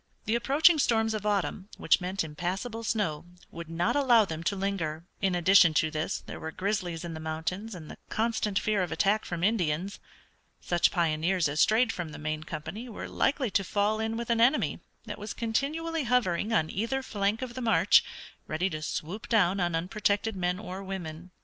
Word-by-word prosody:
The 215 - 0
approaching 295 +7 +4
storms 225 -4 +2
of 210 -1 -3
autumn, 200 -1 -1
which - - +3
meant 185 +1 -2
impassable 185 +9 -4
snow, 200 -9 -1 0.3
would 170 -1 -8
not 170 +6 0
allow 245 -6 +5
them 160 -3 -5
to 200 - +1
linger. 175 -5 -3 0.2
In 190 -2 +1
addition 175 -2 +6
to 155 +1 +2
this 155 +1 -3
there - - -8
were 160 - -5
grizzlies 180 -2 -2
in 170 - -5
the 160 - -6
mountains 160 +7 -4
and 160 -3 -9
the - - -12
constant 220 -3 0
fear 210 -1 +1
of 180 - -2
attack 200 +6 +1
from 175 -1 -4
Indians. 185 -2 0 0.6
Such 175 -1 +2
pioneers 170 +1 +1
as 145 +2 0
strayed 225 +2 +4
from 175 -4 -5
the - - -7
main 155 0 -3
company 215 +13 -6
were 220 - -6
likely 265 -4 0
to 195 - +2
fall 205 +3 0
in 220 0 -2
with 235 0 -3
an 230 -1 +2
enemy 260 +6 +3 0.3
that - - -7
was 210 0 -6
continually 300 +7 -1
hovering 230 -4 +1
on 160 -8 +1
either 235 +7 -2
flank 205 +1 -1
of 245 -2 -6
the 255 - -6
march, 230 -2 +5 0.4
ready 180 +5 -1
to 155 -1 -4
swoop 175 +7 -5
down 200 -4 +3
upon 175 -2 0
unprotected 205 +4 0
men 180 -1 -1
or 195 -2 -7
women. 180 -3 -6
195 Hz, 190 wpm, -28 LUFS, 170-225 Hz, 0.6 s, addition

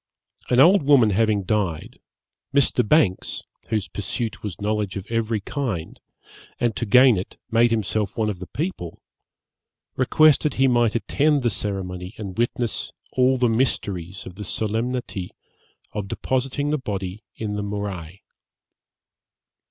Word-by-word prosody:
An 125 - +3
old 180 +8 +7
woman 135 -6 +5
having 105 0 +2
died, 95 -5 -2 0.6
Mr. 140 -2 +3
Banks, 110 - +2 0.2
whose 110 -3 -1
pursuit 110 +3 -4
was 100 -7 -6
knowledge 105 -1 -1
of 100 -1 -5
every 115 -1 0
kind, 100 - -4 0.6
and 120 -3 +1
to 120 - -2
gain 125 +1 +6
it 90 - -6
made 115 +1 +5
himself 110 -1 -1
one 110 -1 +1
of 100 -4 -3
the 90 - -7
people, 145 - -5 0.9
requested 150 +2 +4
he 135 +1 +4
might 120 -3 +3
attend 145 +4 +2
the 120 - +2
ceremony 95 -1 -4
and 100 -4 -6
witness 120 -1 -1 0.2
all 130 0 +3
the 125 -1 +3
mysteries 100 -7 -1
of 95 - -8
the 105 +3 -8
solemnity 110 -1 -2 0.6
of 105 -2 -4
depositing 135 +7 -1
the 150 - +1
body 100 -3 -5
in 105 -2 -4
the 105 - -2
morai. 100 -3 -5
110 Hz, 135 wpm, -23 LUFS, 100-125 Hz, 0.9 s, old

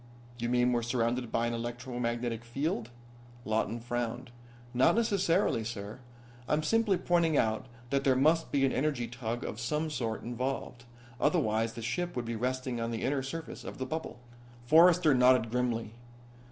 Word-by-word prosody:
"You 120 0 -1
mean 125 0 +3
we're 120 - +1
surrounded 120 0 -1
by 115 - +1
an 120 - -1
electromagnetic 120 -1 -3
field?" 120 -1 -2 0.6
Lawton 110 +1 0
frowned. 120 +1 -3 0.4
"Not 125 +9 +4
necessarily, 195 - +2
sir. 110 0 -6 0.5
I'm 150 +1 +1
simply 220 +2 +2
pointing 170 -4 +2
out 110 +3 +1 0.2
that 140 0 +1
there 135 -2 +4
must 155 +5 +3
be 140 -1 +3
an 135 - +1
energy 140 -4 0
tug 120 -1 -4
of 110 - -5
some 150 +6 -1
sort 115 -5 -3
involved. 125 0 -4 0.3
Otherwise 115 -8 +1
the 115 - -7
ship 175 +9 -2
would 125 -1 -2
be 115 0 -3
resting 125 +1 -2
on 115 - -1
the 115 -1 -3
inner 135 +1 +1
surface 160 +5 -6
of - - -7
the 130 - -3
bubble." 160 +5 -5 0.5
Forrester 165 +2 +6
nodded 125 -3 +4
grimly. 115 -3 -1
125 Hz, 160 wpm, -30 LUFS, 115-145 Hz, 0.6 s, Forrester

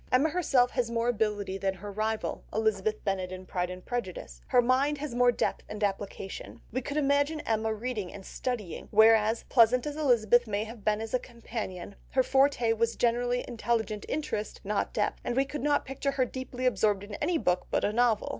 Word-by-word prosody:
Emma 275 +5 +4
herself 275 -7 +2
has 245 -3 0
more 235 0 0
ability 205 -4 -1
than 195 0 0
her 205 +2 -8
rival, 215 +2 -2
Elizabeth 215 -1 0
Bennet, 190 -2 -1
in 185 0 -7
Pride 180 -1 -2
and 180 0 -8
Prejudice; 185 - -5
her - - +4
mind 260 +4 +3
has 290 -2 -5
more 245 0 +4
depth - - -1
and 210 0 -5
application: 195 -1 -4
we 260 - -1
could 285 +3 -4
imagine 285 +2 +2
Emma 220 0 0
reading 220 -4 -3
and 195 -2 -10
studying, 230 -9 -4
whereas, 220 +1 +5
pleasant 245 +1 +4
as 295 0 -4
Elizabeth 240 -5 +3
might 210 0 -1
have 225 -1 -10
been 210 +1 +1
as 225 0 -6
a 255 - +3
companion, 220 -7 -6 0.2
her 260 - +4
forte 265 -4 +3
was 230 +1 0
general 240 +1 +1
intelligent 230 -3 -1
interest 220 -8 -3
not 210 +1 -1
depth, 210 - -1
and 240 - -2
we 270 +1 +3
could 295 +2 -5
not 290 +1 +2
picture 275 +1 -2
her 260 -2 +2
deeply 255 0 -5
absorbed 210 -4 +2
in 205 +1 -9
any 330 +3 +2
book 180 - 0
but - - +1
a 205 - 0
novel. 235 -2 +2
230 Hz, 195 wpm, -29 LUFS, 210-255 Hz, 0.2 s, whereas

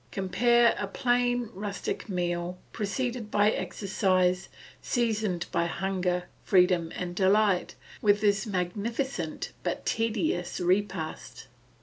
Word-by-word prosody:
Compare 235 +5 +3
a 205 - -2
plain 245 +1 +1
rustic 200 +2 -4
meal, 175 -1 -2 0.2
preceded 230 +2 -2
by 210 +1 +4
exercise, 185 -4 0 0.3
seasoned 220 -7 0
by 170 - +1
hunger, 180 0 -1 0.2
freedom, 180 -3 +3
and 175 -1 -4
delight, 195 0 +3 0.3
with 205 -1 +4
this 205 0 +2
magnificent 200 - -2
but - - -3
tedious 215 -6 -1
repast. 180 -3 -1
195 Hz, 100 wpm, -28 LUFS, 180-220 Hz, 0.3 s, by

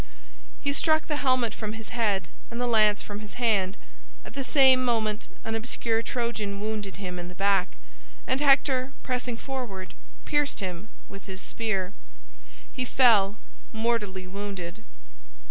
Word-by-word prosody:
He 280 - +1
struck 315 +1 +3
the 300 - -1
helmet 255 -5 +2
from 215 -1 -4
his 225 -1 -8
head 205 -7 +1 0.2
and 235 - -5
the 245 - +1
lance 215 -3 +4
from 205 0 -6
his 210 -1 -9
hand. 210 -5 +2 0.5
At - - -10
the 275 - -2
same 260 0 +6
moment 220 -3 0 0.2
an 225 - -3
obscure 225 0 0
Trojan 230 -4 -2
wounded 210 -2 -3
him 180 -2 -5
in 175 - -5
the 180 - -10
back, 195 - +2 0.5
and 270 - +1
Hector, 275 -2 +4
pressing 250 -2 -2
forward, 240 -9 -5 0.3
pierced 295 -1 +1
him 185 +1 -4 0.2
with 195 - -11
his 190 -1 -7
spear. 200 -4 -2 0.8
He 255 - -1
fell 225 -6 +5 0.3
mortally 220 -5 -1
wounded. 195 0 -6
220 Hz, 145 wpm, -27 LUFS, 200-250 Hz, 0.8 s, same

